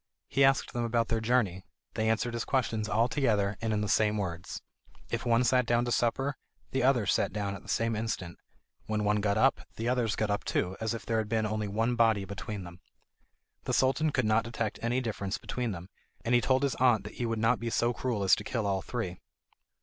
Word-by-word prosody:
He 135 - +2
asked 135 0 +3
them 120 - -1
about 115 -1 0
their 115 -1 0
journey; 110 -6 +1 0.3
they 110 0 0
answered 115 +2 0
his 115 -1 -2
questions 110 -5 -1
all 115 +2 +3
together, 105 -7 +1
and 115 -1 -1
in 105 -1 0
the 105 - -1
same 105 +1 +2
words. 90 -3 -4 0.5
If - - -2
one 115 +1 +4
sat 125 0 +3
down 120 0 +2
to 120 - -2
supper, 135 +4 0 0.3
the 135 - 0
others 125 -4 +3
sat - - +1
down 100 -2 -2
at 95 - -8
the - - -17
same 115 0 +1
instant. 105 -6 -4 0.5
When 110 -1 -1
one 105 0 +2
got 100 0 +1
up, 135 +5 +3
the 115 - -3
others 120 -3 +1
got 110 -1 0
up 105 - -1
too, 90 +1 -1
as 110 +1 -1
if 115 - -8
there 115 -1 +1
had 110 -1 -3
been 110 -1 +1
only 110 0 -2
one 115 +4 0
body 110 -4 +3
between 100 +1 -6
them. 85 -1 -11 0.9
The - - -1
Sultan 135 +4 +2
could 125 -5 0
not 110 +1 +3
detect 115 -3 -3
any 120 +2 0
difference 100 -4 -3
between 125 -2 -3
them, 90 -1 -7 0.4
and 115 - +1
he 120 - +5
told 130 +2 +2
his 140 - +1
aunt 125 -5 +4
that 105 - -8
he 120 - 0
would 115 0 -1
not 115 +3 +2
be 115 - -3
so 120 +1 +1
cruel 120 -5 -2
as 95 - +4
to 105 - -5
kill 110 0 -2
all 95 -1 0
three. 95 -7 -4
115 Hz, 230 wpm, -30 LUFS, 105-120 Hz, 0.9 s, he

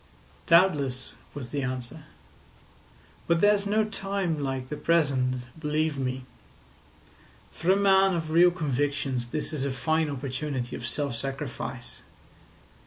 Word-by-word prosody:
"Doubtless," 145 -8 +3 0.2
was 130 -4 -6
the 145 - -1
answer; 125 -2 -5 1.2
"but 170 0 +3
there's 205 +1 +4
no 215 +1 +2
time 195 -6 -2
like 135 -2 -3
the 150 - -3
present, 135 -5 +1 0.2
believe 155 -1 0
me. 130 -1 -3 1.3
For 170 - -3
a - - +5
man 195 -1 +4
of 160 -2 -3
real 175 +2 +7
convictions 140 -6 -1
this 155 +5 -4
is 145 -3 -2
a 140 - 0
fine 155 +4 0
opportunity 130 -2 -3
of 120 - -5
self 140 -1 -1
sacrifice. 135 -1 -5
145 Hz, 125 wpm, -27 LUFS, 130-170 Hz, 1.3 s, real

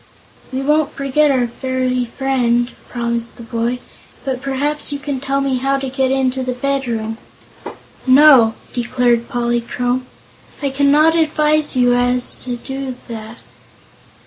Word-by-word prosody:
"We 265 +1 -2
won't 300 +1 +2
forget 280 +2 +2
our 255 -3 +2
fairy 255 +1 -1
friend," 240 -1 0 0.2
promised 235 -1 -2
the 235 - -9
boy; 235 +1 -2 0.5
"but 260 -2 -2
perhaps 285 +3 -1
you 285 - -2
can 280 -1 -4
tell 275 +1 -1
me 270 -2 0
how 275 +2 0
to 270 -1 -4
get 265 -1 +1
into 265 -1 0
the 255 0 -2
bedroom." 245 -4 -2 0.9
"No," 260 -4 +7 0.2
declared 240 -1 +1
Polychrome, 245 +1 -1 0.5
"I 280 -2 -1
cannot 290 +4 +4
advise 305 -2 +2
you 245 -1 +4
as 245 0 +2
to 260 +1 -5
that. 220 0 -7
260 Hz, 130 wpm, -18 LUFS, 240-275 Hz, 0.9 s, No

